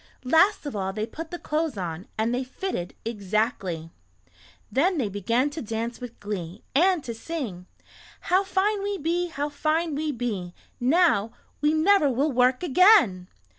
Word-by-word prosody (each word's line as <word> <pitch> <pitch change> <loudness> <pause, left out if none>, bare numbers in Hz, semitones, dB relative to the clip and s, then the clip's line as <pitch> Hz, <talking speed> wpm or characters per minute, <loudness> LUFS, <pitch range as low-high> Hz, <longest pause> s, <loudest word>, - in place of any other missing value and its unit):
Last 325 +8 +4
of 285 - -4
all 190 -1 -2
they 215 +1 -2
put 320 +7 -8
the 350 - -5
clothes 310 -6 -2
on, 175 0 -5
and 225 +2 0
they 250 +2 0
fitted 255 - -5
exactly. 200 -6 -2 0.8
Then 345 +7 +2
they 240 -8 0
began 230 +8 0
to 310 +2 -5
dance 230 +2 -4
with 245 -1 -8
glee, 195 -2 -5
and 345 +2 +3
to 235 - -5
sing: 225 - -5 0.5
"How 370 +2 +2
fine 395 +2 0
we 405 0 -2
be, 345 +2 0
how 295 -3 -3
fine 310 +3 0
we 300 +1 -1
be! 210 -9 -4 0.2
Now 250 - +3 0.3
we 300 +1 +3
never 315 -1 +4
will 275 +4 +1
work 255 +3 +2
again!" 310 - +5
260 Hz, 160 wpm, -25 LUFS, 215-330 Hz, 0.8 s, again